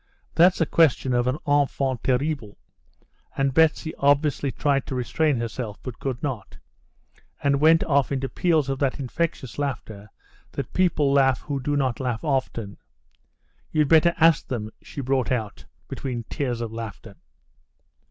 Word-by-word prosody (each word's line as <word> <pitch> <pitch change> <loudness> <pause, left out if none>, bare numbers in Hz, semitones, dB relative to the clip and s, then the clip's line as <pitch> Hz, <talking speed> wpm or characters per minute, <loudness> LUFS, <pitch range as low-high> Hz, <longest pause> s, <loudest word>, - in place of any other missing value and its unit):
That's 175 +2 +5
the 165 - +2
question 145 -5 +2
of 120 0 +1
an 130 +3 0
enfant 140 -3 +1
terrible," 130 -4 -1 0.8
and 135 -1 +1
Betsy 160 +1 +2
obviously 140 -1 +2
tried 140 -1 0
to 135 - -4
restrain 135 +4 0
herself, 115 -2 -4
but 130 -3 -7
could 130 -3 -4
not, 125 -9 -4 0.9
and 140 -1 +2
went 160 +1 +5
off 140 -3 +1
into 135 -1 -1
peals 160 -2 +1
of 135 -1 -2
that 140 0 0
infectious 140 -1 -3
laughter 110 -7 -4 0.4
that 135 - -5
people 155 -6 +2
laugh 135 -2 +3
who 140 -2 -3
do 145 +3 -1
not 130 -4 0
laugh 125 -3 -2
often. 130 -8 -2 0.9
"You'd 150 -3 +2
better 165 +1 +5
ask 165 -3 +4
them," 110 -4 -4
she 140 - -7
brought 130 -1 0
out, 110 -5 -3 0.2
between 125 -4 -4
tears 125 -4 -2
of 115 -1 -4
laughter. 110 -2 -8
135 Hz, 150 wpm, -24 LUFS, 125-145 Hz, 0.9 s, That's